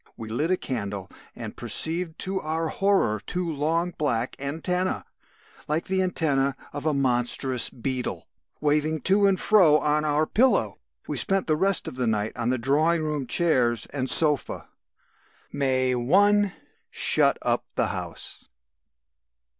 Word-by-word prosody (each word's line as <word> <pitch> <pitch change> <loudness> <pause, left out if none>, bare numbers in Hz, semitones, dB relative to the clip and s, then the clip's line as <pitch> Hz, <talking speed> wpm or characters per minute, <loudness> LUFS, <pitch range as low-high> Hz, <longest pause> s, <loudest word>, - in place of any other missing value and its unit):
We 110 -1 -8
lit 145 +9 -1
a 185 - +2
candle 100 - -5 0.2
and - - -8
perceived 165 0 0
to 190 +1 -2
our 160 +1 -2
horror 190 - +1
two 180 -1 -2
long 165 +4 -1
black 125 -5 -1
antennæ 165 +6 -2 0.6
(like 155 +3 -1
the 190 0 -1
antennæ 145 -7 0 0.2
of 145 +2 -4
a 155 - +2
monstrous 125 -1 +1
beetle) 130 +1 -4 0.3
waving 150 +1 0
to 200 +6 +3
and 190 -2 +1
fro 180 -9 +5
on 150 0 0
our 150 +1 +1
pillow. 205 - +1 0.3
"We - - -3
spent 195 -1 +1
the 155 - +1
rest 195 +4 +1
of - - -7
the 125 -2 -1
night 105 -1 -1
on 120 0 -2
the 130 - +1
drawing 155 +7 +1
room 150 -4 -3
chairs 120 -10 +1
and 130 -2 -2
sofa. 150 -5 +4 0.8
"May 130 -2 0
1. 200 +11 +3 0.4
Shut - - +2
up - - 0
the - - 0
house." - - -7
150 Hz, 145 wpm, -25 LUFS, 130-175 Hz, 0.8 s, fro